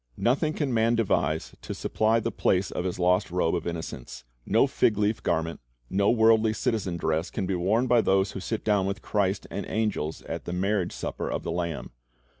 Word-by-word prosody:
Nothing 150 +6 +1
can 145 -5 -1
man 115 +1 +3
devise 95 -8 0
to - - -6
supply 110 +1 +1
the 115 +1 -2
place 95 -2 +1
of 90 - -3
his 90 - -2
lost 90 +2 +2
robe 90 -2 +1
of - - -2
innocence. 80 -7 -6 0.2
No - - +4
fig 105 - +2
leaf 105 +1 +1
garment, 80 -1 -1 0.3
no 100 +1 +3
worldly 110 -1 +4
citizen 110 -6 -1
dress, 80 +1 -1
can 100 - -3
be 95 - -1
worn 100 +8 +2
by 120 -2 +4
those 95 -1 +2
who - - -6
sit 110 +3 -3
down 100 -3 +2
with 100 +2 -4
Christ 100 -2 0
and 100 - -3
angels 105 -8 -2
at - - -6
the 85 - -4
marriage 95 0 0
supper - - -4
of - - -3
the - - -3
Lamb. 85 -2 -3
100 Hz, 200 wpm, -27 LUFS, 90-110 Hz, 0.3 s, No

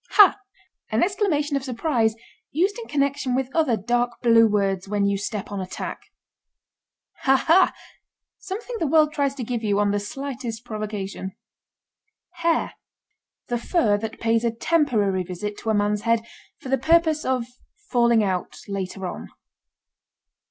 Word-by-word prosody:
### - - -60
HA! 410 -3 +9 0.6
An - - +2
exclamation 345 -7 0
of 275 - -1
surprise 240 -3 0 0.3
used 380 - 0
in 460 - -8
connection 280 -3 0
with 265 0 -2
other 300 -9 +3
dark 240 +3 -1
blue 230 -1 +6
words 195 -3 0
when 205 0 0
you 200 0 +2
step 205 +1 -4
on 200 -1 -3
a 185 - -5
tack. - - -5 1.2
HA, 270 0 +5
HA! 360 +3 +6 0.7
Something 460 +5 -5
the 325 - 0
world 305 +1 +4
tries 280 -2 0
to 260 - -4
give 235 0 -3
you 205 -2 +1
on 205 -1 +2
the 205 - +1
slightest 240 0 -6
provocation. 210 -4 -5 1.0
HAIR. 335 -1 +1 0.7
The 240 -1 -1
fur 235 - +2
that 220 +1 -6
pays 230 0 +1
a 235 - +2
temporary 225 - +1
visit 185 +3 -5
to 225 - -4
a 220 - +3
man's 205 0 +1
head 230 0 +2 0.4
for 260 - -9
the 270 -1 +2
purpose 320 +2 +3
of 255 -2 0 0.5
falling 235 -3 +4
out 185 -3 -2
later 195 -1 -4
on. 180 - -6
235 Hz, 155 wpm, -24 LUFS, 205-290 Hz, 1.2 s, HA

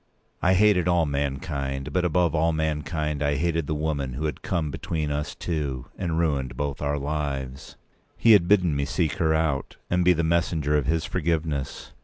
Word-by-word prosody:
I 95 +1 +4
hated 95 -3 +4
all 85 -2 +3
mankind; 70 -1 -3
but 90 - +1
above 85 -1 +2
all 80 +1 +2
mankind 75 -1 -2
I 75 0 +1
hated 85 0 0
the 75 - -1
woman 75 -4 -2
who 75 +5 -3
had 75 - -3
come 80 -4 -1
between 80 0 -3
us 75 0 -3
two, 70 -7 -3
and 85 -4 -2
ruined 70 -7 0
both 70 -1 -3
our 75 0 0
lives. 70 -3 -4 0.4
He 115 - +5
had 100 -5 +6
bidden 90 -6 +3
me 70 0 0
seek 75 0 -1
her 80 -1 +2
out, 75 -4 -1
and 90 0 +3
be 90 +1 +6
the 85 0 0
messenger 80 -3 +1
of 75 -3 +1
his 80 0 +1
forgiveness. 80 -5 -2
75 Hz, 185 wpm, -25 LUFS, 70-85 Hz, 0.4 s, had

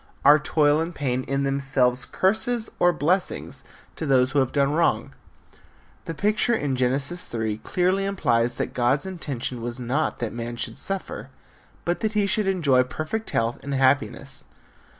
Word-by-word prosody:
Are 145 +2 +8
toil 150 0 +2
and 165 +1 -3
pain 130 -3 -1
in 140 +1 -1
themselves 135 -2 +1
curses 220 +4 +1
or 175 - +5
blessings 175 +4 0 0.3
to 160 - -3
those 130 -1 +3
who 145 - +2
have 130 -2 +1
done 140 -1 +2
wrong? 165 +2 +1 0.9
The 165 - -5
picture 215 +6 +1
in 140 -9 -1
Genesis 135 +7 -1
3 110 -2 -3
clearly 185 +6 0
implies 120 -12 +1
that - - -3
God's 130 +5 +1
intention 140 -9 -4
was 120 +2 -4
not 130 +6 -1
that 120 -3 -4
man 120 0 -5
should 115 -1 -4
suffer 195 -1 -3 0.6
but 175 0 0
that 220 -1 -1
he 210 -1 +2
should 205 +1 0
enjoy 155 -9 +3
perfect 155 - -4
health 115 +1 0
and 140 0 -3
happiness. 135 +1 +1
140 Hz, 160 wpm, -24 LUFS, 125-175 Hz, 0.9 s, Are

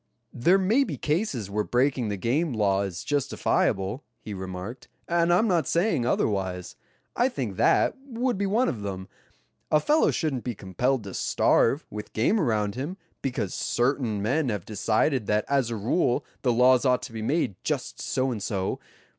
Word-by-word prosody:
"There 170 +11 +4
may 210 +9 +3
be 165 - -4
cases 150 - -1
where 105 +2 -1
breaking 125 -1 +1
the 100 - -2
game 135 - 0
law 100 -3 +2
is 95 -3 -4
justifiable," 125 -5 0 0.2
he 105 - -7
remarked, 95 +5 -7 0.2
"and 170 0 +2
I'm 185 +6 +4
not 170 -8 +1
saying 170 - +1
otherwise. 95 -6 -1 0.4
I 245 +2 +3
think 120 - -4
that - - +3
would 245 -1 -1
be 200 +1 -1
one 230 +6 +2
of 110 - -3
them. 95 -2 -5 0.6
A 150 - +4
fellow 300 - +3
shouldn't 140 -7 -1
be 120 -2 -3
compelled 120 +7 -1
to 100 -2 -8
starve, - - +2
with 105 0 -7
game 130 - +2
around 105 - +1
him, 145 +10 -5 0.2
because 125 -8 -2
certain 120 -4 0
men 135 +5 +1
have 105 -6 -3
decided 110 +3 0
that 105 0 +1
as 135 -4 +1
a 115 - -2
rule 120 - +1 0.2
the 125 - +2
laws 125 +1 +5
ought 125 -2 +2
to - - -8
be 110 - -5
made 135 -1 0
just - - -3
so 130 0 0
and 110 -4 -4
so. 95 -1 -2
125 Hz, 175 wpm, -26 LUFS, 105-155 Hz, 0.6 s, laws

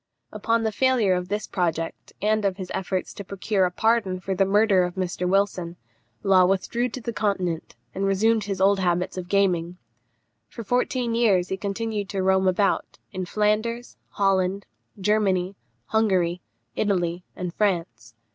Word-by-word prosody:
Upon 225 +2 0
the 220 - 0
failure 240 -4 +2
of 180 0 -2
this 210 +2 -2
project, 165 -2 -3
and 215 0 +2
of 195 -2 0
his 185 -2 -7
efforts 185 0 -3
to 200 - -7
procure 195 0 0
a 180 - -1
pardon 215 -2 +1
for 190 +1 -3
the 195 +1 +2
murder 205 -1 +4
of 180 -1 -2
Mr. 180 -1 -2
Wilson, 190 -3 0 0.5
Law 185 -2 +5
withdrew 235 +6 0
to 255 - -7
the 235 0 -4
Continent, 185 -7 -2 0.2
and 195 - -3
resumed 210 +2 +2
his 195 -2 -3
old 195 +1 +4
habits 180 -1 0
of 180 -1 -6
gaming. 180 -3 +1 0.7
For 230 - -8
fourteen 245 +1 0
years 200 -6 +2
he 190 - -1
continued 205 +1 -3
to 195 -2 -2
roam 190 0 +3
about, 190 +2 +1
in 185 -1 -4
Flanders, 220 +4 -1
Holland, 195 -1 +1 0.3
Germany, 195 -2 +1 0.3
Hungary, 180 - +1 0.3
Italy, 175 -4 0
and 180 -2 -5
France. 165 - -2
195 Hz, 155 wpm, -24 LUFS, 180-215 Hz, 0.7 s, Law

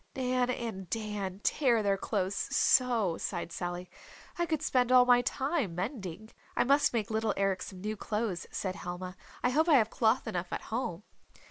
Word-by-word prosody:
"Nan 255 -1 +1
and 220 -7 -4
Dan 210 -3 -3
tear 240 -7 +2
their 200 -1 +3
clothes 195 -1 -1
so," 230 -7 +2
sighed - - -3
Sally, 175 +1 -4 0.5
"I 345 0 -1
could 315 -3 -1
spend 250 -1 +2
all 250 -1 +7
my 245 -1 +6
time 270 - -1
mending." 200 - -5 0.2
"I - - +3
must 280 +3 +4
make 225 -2 -2
little 220 -1 0
Eric 195 -1 +1
some 185 -1 -8
new 215 +2 -2
clothes," 210 -3 -3
said 190 -1 -3
Helma. 180 +1 -6 0.3
"I 245 - +3
hope 315 +5 +2
I 310 - +7
have 225 -4 +4
cloth 225 +2 +2
enough 180 -4 -3
at - - -3
home." 210 -6 -2
220 Hz, 175 wpm, -31 LUFS, 190-250 Hz, 0.5 s, all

